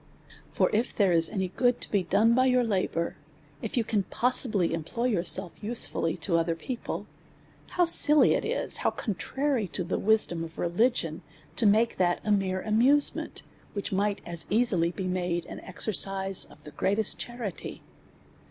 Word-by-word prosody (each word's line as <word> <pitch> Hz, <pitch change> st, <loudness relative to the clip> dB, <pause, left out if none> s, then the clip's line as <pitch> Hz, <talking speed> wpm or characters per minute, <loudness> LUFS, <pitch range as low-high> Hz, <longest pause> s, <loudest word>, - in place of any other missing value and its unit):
For -, -, +1 dB
if 230 Hz, +4 st, -1 dB
there 195 Hz, -3 st, +3 dB
is 165 Hz, -1 st, +4 dB
any 190 Hz, -4 st, -2 dB
good 245 Hz, +5 st, +1 dB
to -, -, -8 dB
be 200 Hz, -, +2 dB
done 225 Hz, +5 st, +2 dB
by 255 Hz, +2 st, +3 dB
your 250 Hz, -1 st, +3 dB
labour, 185 Hz, -6 st, -2 dB, 0.4 s
if 225 Hz, -, -4 dB
you 235 Hz, -, +2 dB
can 215 Hz, -2 st, 0 dB
possibly 215 Hz, -4 st, 0 dB
employ 165 Hz, +9 st, -4 dB
yourselves 190 Hz, -4 st, +1 dB
usefully 210 Hz, -7 st, -1 dB
to 170 Hz, -4 st, +1 dB
other 165 Hz, 0 st, -1 dB
people, 235 Hz, +9 st, -6 dB, 0.7 s
how 355 Hz, -, +5 dB
silly 305 Hz, -3 st, +6 dB
is -, -, -1 dB, 0.3 s
it, -, -, -9 dB
\v)\v -, -, +1 dB
contrary 250 Hz, +3 st, -2 dB
to 180 Hz, +2 st, -3 dB
the 170 Hz, -, -3 dB
wisdom 205 Hz, -6 st, +2 dB
of 165 Hz, 0 st, -10 dB
religion 220 Hz, +9 st, 0 dB, 0.3 s
to 225 Hz, -, +3 dB
make 220 Hz, +3 st, +2 dB
that 175 Hz, -1 st, +1 dB
a 210 Hz, -, 0 dB
mere 190 Hz, -2 st, 0 dB
amusement, 250 Hz, +7 st, +1 dB, 0.3 s
which 200 Hz, -, -4 dB
might 200 Hz, +1 st, 0 dB
as 170 Hz, -3 st, -2 dB
easily 195 Hz, -6 st, +1 dB
be 190 Hz, +1 st, -5 dB
made 180 Hz, -2 st, -2 dB
an -, -, -9 dB
exercise 195 Hz, 0 st, -2 dB
of -, -, -19 dB
the 150 Hz, -, -11 dB
greatest 205 Hz, +6 st, -1 dB
charity 240 Hz, -6 st, -7 dB
200 Hz, 165 wpm, -27 LUFS, 180-235 Hz, 0.7 s, silly